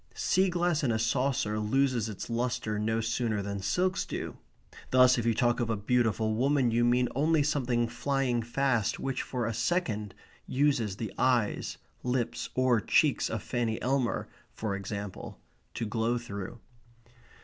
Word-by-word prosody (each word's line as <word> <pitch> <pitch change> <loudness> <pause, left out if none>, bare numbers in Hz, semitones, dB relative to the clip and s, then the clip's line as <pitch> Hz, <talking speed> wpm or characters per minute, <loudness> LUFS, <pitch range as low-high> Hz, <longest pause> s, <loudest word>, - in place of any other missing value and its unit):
Sea 190 0 +2
glass 175 -3 +1
in 125 - +2
a 110 - +1
saucer 115 -2 0
loses 120 +1 +1
its 105 - -6
lustre 120 -2 -1
no 110 +1 0
sooner 115 -2 -1
than 100 0 -4
silks 180 - 0
do. - - -5 0.5
Thus 130 0 +6
if 115 - -1
you 115 - +2
talk 120 +1 +2
of 120 -2 -1
a 110 - 0
beautiful 110 0 +1
woman 130 +1 +2
you 120 +1 +2
mean 125 +1 +3
only 150 +3 +2
something 125 -5 +1
flying 125 0 0
fast 120 -2 0
which 135 -1 -2
for 125 -3 -3
a 115 - -1
second 110 - -1 0.3
uses 130 -8 +1
the 105 0 -5
eyes, 125 -5 +1 0.2
lips, 125 -1 -2
or 130 -3 +3
cheeks - - +2
of - - -3
Fanny 115 -2 -1
Elmer, 130 -2 0 0.3
for 105 -3 -2
example, 100 0 -6 0.4
to 115 - -2
glow 115 +2 0
through. 100 -2 -6
120 Hz, 155 wpm, -29 LUFS, 110-130 Hz, 0.5 s, Thus